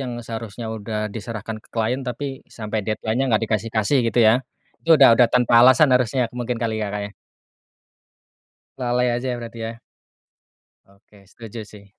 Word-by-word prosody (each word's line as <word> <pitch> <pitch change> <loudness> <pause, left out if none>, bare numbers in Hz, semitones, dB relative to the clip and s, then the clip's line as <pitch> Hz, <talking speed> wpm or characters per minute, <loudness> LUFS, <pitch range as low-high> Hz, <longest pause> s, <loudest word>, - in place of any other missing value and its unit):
yang 125 -3 -4
seharusnya 115 0 -6
udah 105 -1 -4
diserahkan 110 0 -6
ke - - -25
klien 115 +3 -1
tapi 135 +1 -5
sampai 110 -1 -4
deadline-nya 110 +5 -2
nggak 110 -1 +2
dikasih-kasih 110 +4 0
gitu 115 - -1
ya. 110 +4 +5 0.4
Itu 165 -1 +5
udah 135 -5 +7
udah 120 +1 +5
tanpa 120 -1 +4
alasan 130 +3 +6
harusnya, 125 -1 +1
mungkin 120 0 -3
kali 110 -1 -2
ya, 105 - -2
Kak, 105 +1 -4
ya? 100 - -7 1.7
Lalai 125 0 +1
aja 125 +1 -2
berarti 115 -1 -8
ya? 115 0 -6 1.1
Oke, 100 0 -23
setuju 110 +1 -10
sih. 100 -1 -15
115 Hz, 155 wpm, -22 LUFS, 110-125 Hz, 1.7 s, udah